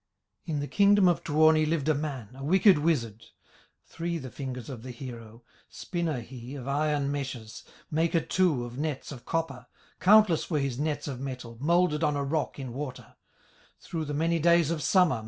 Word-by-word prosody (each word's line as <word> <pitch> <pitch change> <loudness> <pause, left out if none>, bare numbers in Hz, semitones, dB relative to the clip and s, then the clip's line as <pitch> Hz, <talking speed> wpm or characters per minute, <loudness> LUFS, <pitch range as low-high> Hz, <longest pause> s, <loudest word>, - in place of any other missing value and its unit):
In 150 -4 -2
the 145 - -3
kingdom 200 +1 +5
of 175 - +2
Tuoni 155 +1 +4
Lived 155 -2 -1
a 155 - +4
man, 140 -7 -4
a 135 +1 -9
wicked 190 +3 +5
wizard, 120 -9 -1 0.6
Three 170 0 -4
the 130 -5 -8
fingers 130 -4 -6
of 130 -5 -7
the 130 - -9
hero, 115 -2 -9 0.3
Spinner 170 -8 -3
he 125 +2 -9
of 135 -2 -7
iron 145 0 0
meshes, 130 -6 -5 0.3
Maker 165 +2 +2
too 165 -10 +1
of 120 +2 -8
nets 150 -2 -3
of 130 -4 -10
copper, 135 -7 -3 0.3
Countless 200 -3 +5
were 160 - +1
his 135 -3 -2
nets 150 -1 -2
of 135 -3 -5
metal, 125 -3 -6
Moulded 170 0 +2
on 150 -2 +2
a 140 - -1
rock 150 +2 -2
in 130 -4 -6
water, 135 -1 -7 0.6
Through 160 -2 -4
the 145 0 -4
many 165 +2 +1
days 170 -1 +4
of 165 -2 -2
summer. 165 - +3
145 Hz, 180 wpm, -28 LUFS, 130-165 Hz, 0.6 s, kingdom